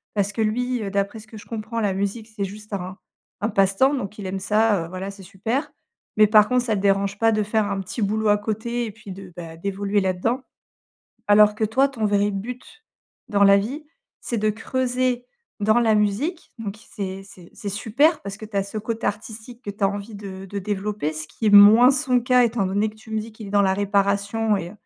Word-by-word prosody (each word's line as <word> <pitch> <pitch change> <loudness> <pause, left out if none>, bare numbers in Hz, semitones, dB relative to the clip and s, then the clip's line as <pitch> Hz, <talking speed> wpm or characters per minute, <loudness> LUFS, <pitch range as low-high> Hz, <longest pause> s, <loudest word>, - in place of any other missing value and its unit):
parce 200 0 0
que 225 - -2
lui, 245 +3 0
heu, 200 - -3
d'après 200 +2 -2
ce 220 - -14
que 220 0 -11
je - - -12
comprends, 225 +1 -4
la 200 -2 +1
musique 200 +3 -3
c'est 200 - -2
juste 210 +2 -10
un 185 0 -5 0.4
un 210 - 0
passe-temps, 195 +8 +3
donc 215 -6 -4
il 205 - -7
aime 190 +1 -3
ça, 210 -3 +2
heu, - - -9
voilà, 185 +2 -5
c'est 195 - -13
super 225 - -3 0.5
mais 215 - +7
par 210 0 +6
contre, 250 -1 +2
ça 225 - 0
le 195 - -2
dérange 200 0 +1
pas 225 0 +4
de 215 -1 +1
faire 210 0 0
un 195 - -2
petit 190 +5 -6
boulot 215 +1 +1
à 205 - +5
côté 225 +3 -3
et 220 - -6
puis 205 -2 -12
de, 190 -1 -10
beh, 165 -1 -8
d'évoluer 200 +3 -1
là-dedans. 190 +7 0 0.9
Alors 210 0 +6
que 220 - 0
toi, 260 +6 +2
ton 235 -6 -4
vrai 205 0 +2
but 250 - -7 0.4
dans 200 -2 +2
la 200 0 +7
vie, 260 +10 -3 0.4
c'est 235 - -3
de 215 +1 +2
creuser 250 +2 -1 0.4
dans 215 +3 +3
la 225 -2 +3
musique 215 - -1
donc 210 -2 -5
c'est 195 -2 -5
c'est 180 -3 -15
c'est 205 - -7
super 245 - +2
parce 200 0 -6
que 215 - -9
tu 210 -2 -7
as 195 - +3
ce 200 +2 -6
côté 225 +2 -3
artistique 220 +3 -7
que 205 - -5
tu 200 +1 -10
as - - +5
envie 205 +2 -6
de 195 -2 -8
de 200 +1 -5
développer, 205 -4 -2
ce 155 0 -6
qui 225 - -4
est - - +5
moins 210 +5 +9
son 260 -2 +2
cas 250 +1 +4
étant 230 -3 0
donné 200 +3 0
que - - -19
tu 220 0 -15
me 220 - -1
dis 220 +1 -9
qu'il 215 -2 -10
est - - -8
dans 205 0 +4
la 190 -1 +2
réparation 200 +2 +1
et 175 -2 -5
210 Hz, 230 wpm, -23 LUFS, 200-225 Hz, 0.9 s, moins